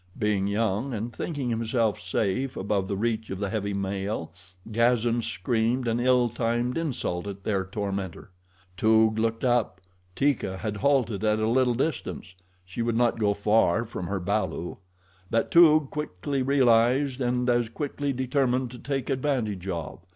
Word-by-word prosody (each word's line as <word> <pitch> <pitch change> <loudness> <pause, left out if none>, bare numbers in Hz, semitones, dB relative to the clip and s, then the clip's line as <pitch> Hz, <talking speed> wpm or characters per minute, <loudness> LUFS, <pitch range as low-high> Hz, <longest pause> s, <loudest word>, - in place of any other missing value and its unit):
Being 105 -2 +1
young, 110 +4 -1
and 115 +3 -4
thinking 140 -7 -3
himself 115 -1 0
safe 105 +7 -1
above 100 -1 -1
the 100 - -2
reach 110 +1 -1
of 95 - -4
the 100 0 -3
heavy 100 -2 -2
male, 100 -2 -3 0.4
Gazan 120 +1 +2
screamed 115 +5 -1
an 115 +1 +1
ill 125 0 +3
timed 120 +1 -1
insult 125 - -2
at 100 -1 -7
their 100 -3 0
tormentor. 95 -2 -5 0.5
Toog 110 +1 +4
looked 115 0 -1
up. 120 -6 +1 0.4
Teeka 135 -9 0
had 105 +1 -4
halted 120 -4 +1
at 105 0 +2
a 110 0 0
little 125 +1 +2
distance 130 - -3 0.3
she 95 +6 -5
would 115 0 0
not 120 -1 +2
go 105 -2 +2
far 105 0 +2
from 90 -6 -6
her 95 +1 -2
balu; 100 -2 -2 0.5
that 115 - 0
Toog 155 -4 +6
quickly 140 -1 -3
realized 130 0 +3
and 125 0 0
as 120 -2 +2
quickly 145 +2 -3
determined 130 -1 0
to 125 - -10
take 135 +1 -3
advantage 125 -9 -1
of. 85 -2 -4
115 Hz, 155 wpm, -26 LUFS, 100-125 Hz, 0.5 s, Toog